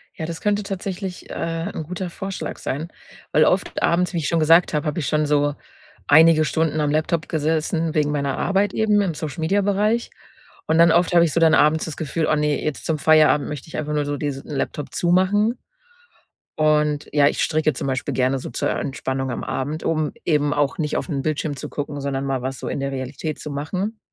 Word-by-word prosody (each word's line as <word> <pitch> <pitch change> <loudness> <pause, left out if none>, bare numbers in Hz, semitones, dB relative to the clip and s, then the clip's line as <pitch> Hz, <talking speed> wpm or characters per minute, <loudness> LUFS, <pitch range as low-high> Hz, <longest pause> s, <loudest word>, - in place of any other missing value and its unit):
Ja, 160 - -4
das 165 0 -6
könnte 205 0 +1
tatsächlich, 190 -1 -5
äh, - - -6 0.4
'n - - -5
guter 180 +3 -5
Vorschlag 195 +2 -5
sein, 155 +5 -4 0.4
weil - - +5
oft - - 0
abends, 180 +2 +1
wie - - -1
ich 155 -3 -1
schon 170 - +1
gesagt 165 +3 +5
habe, 150 -1 0
habe 150 +2 -1
ich 145 - -2
schon 150 0 +1
so 145 0 +1 0.5
einige 160 +1 +6
Stunden 155 -1 0
am 145 -1 +1
Laptop 155 +2 0
gesessen 160 +1 0
wegen 150 -2 +1
meiner 140 -2 -1
Arbeit 195 0 +1
eben 210 -2 +3
im 185 -4 -1
Social-Media-Bereich. 200 - 0 0.6
Und - - +1
dann 170 0 +6
oft 175 +2 +3
habe 170 -1 +6
ich 160 - -2
so - - +2
dann 165 -1 +5
abends 155 0 +4
das 160 - -6
Gefühl: 160 +1 -2
„Oh - - +4
ne, 150 -1 0
jetzt 155 -2 -3
zum 160 - 0
Feierabend 150 -2 +4
möchte 150 -1 -6
ich 160 - -7
einfach 150 -1 -3
nur 150 -1 0
so 145 0 -2
diesen 140 -2 -4
Laptop 145 0 -4
zumachen.“ 190 +6 +2 1.0
Und 150 -1 +2
ja, 145 -1 +5
ich - - 0
stricke 155 -1 +1
zum 130 - -4
Beispiel 130 -1 -2
gerne 130 +1 +1
so - - -7
zur 120 - -2
Entspannung 135 -1 -3
am - - -4
Abend, 150 +4 -3
um 155 -2 0
eben 150 -3 +2
auch 145 -2 0
nicht 150 -2 -1
auf - - -3
'nen 145 -6 -2
Bildschirm 155 0 -2
zu - - -7
gucken, 145 0 -5
sondern 135 -1 -2
mal 135 -2 -1
was 130 0 -4
so - - -6
in - - -3
der 140 0 -2
Realität 135 +4 -5
zu 150 - -7
machen. 185 +10 -3
155 Hz, 210 wpm, -22 LUFS, 145-170 Hz, 1.0 s, einige